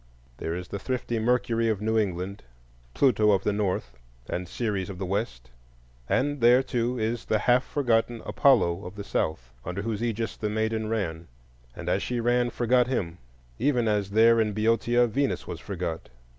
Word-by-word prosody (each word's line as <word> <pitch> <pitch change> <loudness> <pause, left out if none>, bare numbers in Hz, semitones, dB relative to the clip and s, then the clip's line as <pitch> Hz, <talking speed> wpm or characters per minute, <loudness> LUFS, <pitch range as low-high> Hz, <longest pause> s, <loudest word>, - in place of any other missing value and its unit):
There 80 - -3
is 90 0 -6
the 100 - -4
thrifty 120 0 -2
Mercury 115 0 +1
of 110 -3 0
New 110 +1 0
England, 100 -2 -1 0.5
Pluto 110 -6 +4
of 100 -2 +3
the 105 - +1
North, 90 - -2 0.3
and 90 0 -3
Ceres 105 -5 -2
of 95 - -7
the 95 - -3
West; 90 - -3 0.6
and 145 0 0
there, 120 +3 +6
too, 125 -1 -1
is 115 +1 -1
the 110 - +1
half 125 +4 +3
forgotten 120 -4 0
Apollo 100 -9 +3
of 90 0 -8
the 100 - -6
South, 65 -10 -2
under 90 +6 -4
whose 110 -1 -3
aegis 115 -2 -2
the 105 - -2
maiden 110 0 -1
ran,—and 60 - -6
as - - +1
she 125 -1 -2
ran 120 +1 +2
she 120 - -8
forgot 125 +1 +3
him, 90 -10 -2 0.4
even 125 -5 +2
as 105 -2 0
there 115 +2 +5
in 105 -1 0
Boeotia 115 +3 +2
Venus 135 +4 -1
was - - -6
forgot. 80 -1 -5
110 Hz, 175 wpm, -26 LUFS, 95-120 Hz, 0.6 s, there